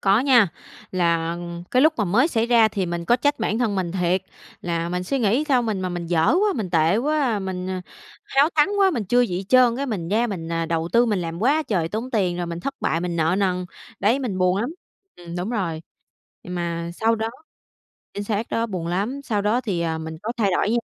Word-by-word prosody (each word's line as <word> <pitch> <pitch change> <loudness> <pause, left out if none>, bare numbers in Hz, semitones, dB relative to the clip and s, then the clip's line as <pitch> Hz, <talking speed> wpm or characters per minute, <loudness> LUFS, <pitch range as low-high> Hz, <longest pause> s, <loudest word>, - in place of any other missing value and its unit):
Có 195 +3 +4
nha, 250 -8 +5 0.4
là 170 -2 +1 0.3
cái 255 +2 +4
lúc 315 - +5
mà 210 - +1
mới 225 - +3
xảy 230 -6 0
ra 230 -2 +5
thì 195 -4 -2
mình 170 0 -3
có 240 - +4
trách 290 +3 +1
bản 220 0 -1
thân 225 -5 0
mình 180 -3 -2
thiệt, 180 0 +1 0.4
là 170 -1 -2
mình 180 +1 -2
suy 275 +9 -1
nghĩ 240 +6 +2
sao 255 -3 +3
mình 215 -4 -2
mà 185 - -2
mình 175 -1 -4
dở 165 -1 +2
quá, 410 +2 +3
mình 205 -8 -3
tệ 165 +3 +3
quá, 270 -3 +1
mình 185 -1 -4 0.6
háo 280 +3 +3
thắng 300 +1 +4
quá, 390 -1 +5
mình 240 - -2
chưa 245 +6 +3
gì 190 -5 -1
trơn 250 -2 +5
cái 275 +2 -2
mình 185 -8 -3
ra 225 +4 +2
mình 175 -7 -5 0.2
đầu 165 0 -1
tư 235 +1 +5
mình 210 -4 +1
làm 170 +2 -4
quá 295 +6 +3
trời 180 - -1
tốn 225 +7 -4
tiền 185 -7 0
rồi 175 -1 -3
mình 170 0 -5
thất 275 +6 -4
bại, 165 - 0
mình 175 -1 -3
nợ 160 +2 +2
nần. 180 -2 0 0.4
Đấy, 220 +7 +3
mình 235 -9 -3
buồn 185 0 +2
lắm. 235 +8 -1 0.5
Ừm, 175 0 -8
đúng 180 +5 -3
rồi. 170 -8 -2 0.6
Mà 170 -1 -3
sau 225 +3 +2
đó 220 0 -2 0.9
chính 205 - -4
xác 215 +1 -1
đó, 230 0 0
buồn 180 -6 -4
lắm, 205 +11 -2
sau 210 -4 -1
đó 215 +5 +2
thì, 190 -7 -2
ờ, 160 -1 -1
mình 160 0 -6
có 230 +3 -2
thay 205 -4 +2
đổi 210 - +1
nha. 235 - +2
200 Hz, 235 wpm, -23 LUFS, 175-240 Hz, 0.9 s, nha